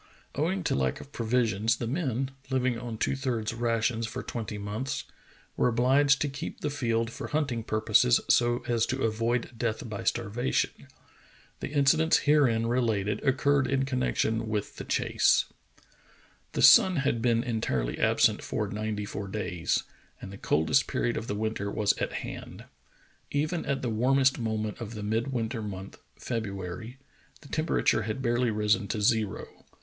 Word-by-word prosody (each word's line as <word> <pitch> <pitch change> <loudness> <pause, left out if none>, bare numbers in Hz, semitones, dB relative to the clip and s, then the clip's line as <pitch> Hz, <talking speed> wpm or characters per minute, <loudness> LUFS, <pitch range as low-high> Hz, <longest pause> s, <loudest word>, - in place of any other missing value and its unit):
Owing 170 +6 -1
to - - 0
lack 65 -2 0
of 140 - -12
provisions, 115 -3 +1
the 120 - -4
men, 135 -1 -1 0.2
living 130 -2 +1
on 120 -2 -6
two 135 - 0
thirds 120 -5 -2
rations 115 0 0
for - - -6
twenty 110 -3 -5
months, 105 +6 -3 0.5
were - - +2
obliged 135 +4 +3
to 145 - +2
keep 135 - -6
the 150 - -1
field 115 -4 -1
for - - -6
hunting 140 -7 -1
purposes 110 - +3
so 120 0 +3
as 115 -2 +1
to 135 +1 -2
avoid 115 +3 0
death 115 -1 -2
by 105 -3 -5
starvation. 120 +2 -1 0.7
The - - -4
incidents 150 +3 +4
herein 135 -7 +3
related 110 -4 0
occurred 140 0 +2
in 135 0 +1
connection 115 -4 0
with 105 -2 -3
the - - -6
chase. - - +2 1.1
The - - 0
sun 185 -1 +8
had 135 -5 0
been 115 -1 +2
entirely 110 - -2
absent - - +3
for - - -2
ninety 105 0 -3
four 100 0 -5
days, 95 -4 -1 0.4
and 95 - -9
the - - -8
coldest 80 - +2
period 120 - -1
of 115 - -4
the 105 - -2
winter 105 -1 -2
was 100 0 +2
at - - -1
hand. - - -8 0.6
Even 155 +4 -1
at 140 -1 -1
the 120 - 0
warmest 130 +4 +3
moment 110 -1 -3
of 115 0 -6
the 105 - -5
midwinter 115 +2 -1
month, 100 -2 -7 0.2
February, 110 +1 -5 0.4
the 140 - -14
temperature 155 -7 +1
had 110 +5 -4
barely 120 0 +2
risen 105 -1 +1
to 110 - -2
zero. 110 -1 +1
115 Hz, 155 wpm, -28 LUFS, 110-130 Hz, 1.1 s, sun